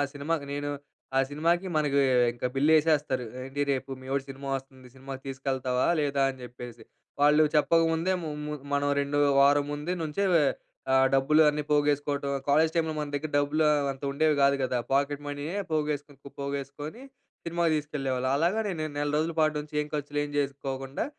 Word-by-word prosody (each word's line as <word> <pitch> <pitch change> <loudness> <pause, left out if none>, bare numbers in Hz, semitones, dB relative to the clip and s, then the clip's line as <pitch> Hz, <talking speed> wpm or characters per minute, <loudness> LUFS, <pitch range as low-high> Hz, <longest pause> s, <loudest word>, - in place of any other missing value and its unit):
సినిమాకి 145 +1 -2
నేను 145 0 -3 0.5
ఆ - - +6
సినిమాకి 170 +5 0
మనకి 145 -2 +2 0.3
ఇంక 120 - -9
బిల్లు 145 +4 +3
ఏసేస్తారు. 145 -5 +1 0.2
ఏంటి 135 +2 -5
రేపు 135 0 -2
మీ 130 - -12
వోడి 140 -1 0
సినిమా 135 +1 -8
వస్తుంది. 130 -1 -12
సినిమాకి 135 0 -8
తీసుకెళ్తావా? 130 -1 -1
లేదా? 140 -1 +1
అని 130 -1 -11
జెప్పేసి. 120 -2 -9 0.4
వాళ్ళు 150 +2 +5
చెప్పకముందే 165 +3 +3
ము 160 - -4 0.2
ము 150 - -4 0.2
మనం 145 0 +1
2 140 +1 -1 0.2
వారం 145 +1 +5
ముందు 150 +4 -3
నుంచే 160 +6 -1 0.7
ఆహ్, 135 0 +5
డబ్బులు 150 +4 +4
అన్నీ 150 0 -3
పోగేసుకోవటం. 145 -1 +1 0.2
కాలేజ్ 155 +3 +4
టైమ్‌లో 160 -1 0
మన 150 -1 -3
దగ్గర 150 +1 -3
డబ్బులు 150 +2 +1
ఆహ్, 145 -2 +2
అంత 135 - -15
ఉండేవి 155 +1 +2
కాదు 140 0 +4
గదా! 125 -1 0
పాకెట్ 140 +1 +1
మనీయే 145 +6 -4 0.2
పోగేసుకొని, 150 -2 -2 0.2
పోగేసుకొని 140 - -5 0.4
సినిమాకి 170 -1 +1
తీసుకెళ్ళేవాళ్ళం. 135 -4 -2
అలాగా 175 +8 +1
నేను 160 -4 -3
నెల 145 0 0
రోజుల 160 +2 0
పాటు 155 -1 +3
నుంచి 150 0 -11
ఏం 150 - -8
ఖర్చులు 145 0 -2
ఏమి 145 - -8
చేసుకోకుండా, 135 -1 -3
145 Hz, 165 wpm, -28 LUFS, 135-155 Hz, 0.7 s, ఆ